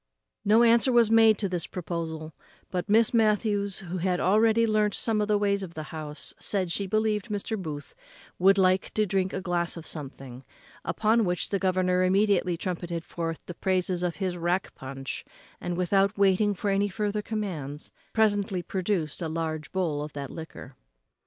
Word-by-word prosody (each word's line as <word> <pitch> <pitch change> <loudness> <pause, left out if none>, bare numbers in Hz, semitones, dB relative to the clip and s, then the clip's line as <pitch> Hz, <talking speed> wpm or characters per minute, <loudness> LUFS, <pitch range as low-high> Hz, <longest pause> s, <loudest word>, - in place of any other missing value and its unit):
No 220 +3 +5
answer 235 +2 +5
was 235 -2 +4
made 225 -2 +6
to 200 - -1
this 180 -3 -2
proposal; 160 -3 -5 0.4
but 180 +2 -3
Miss 225 +3 +4
Matthews, 210 -3 +2
who 180 0 -5
had 180 0 0
already 220 +4 +4
learnt 215 -2 +2
some 220 -2 +1
of 210 - 0
the 210 -1 +3
ways 200 -1 +1
of 180 -3 -7
the 155 - -4
house, 155 -1 -5
said 185 -4 -1
she 200 +3 -1
believed 215 +1 0
Mr. 210 +2 -2
Booth 155 -7 -6 0.5
would 195 +2 +5
like 185 0 +3
to 215 - +3
drink 190 -1 0
a 190 - -3
glass 175 -2 -1
of 165 - -8
something; 135 -4 -8 0.4
upon 220 +7 +2
which 180 -3 -1
the 200 - +1
governor 185 -1 +2
immediately 185 -2 +2
trumpeted 175 -2 -4
forth 165 -1 -4
the 175 - -6
praises 185 0 0
of 175 -2 -1
his 185 -3 -2
rack 175 +2 -1
punch, 135 0 -6 0.4
and, 175 -1 -3
without 195 +3 +2
waiting 200 +1 +3
for 200 +2 -1
any 200 +1 +2
farther 210 +1 -2
commands, 175 -10 -5 0.2
presently 205 -4 +1
produced 180 -6 -2
a 165 - -2
large 160 -1 -3
bowl 165 -6 -1
of 150 0 -6
that 140 -2 -6
liquor. 160 -4 -9
185 Hz, 175 wpm, -27 LUFS, 170-210 Hz, 0.5 s, made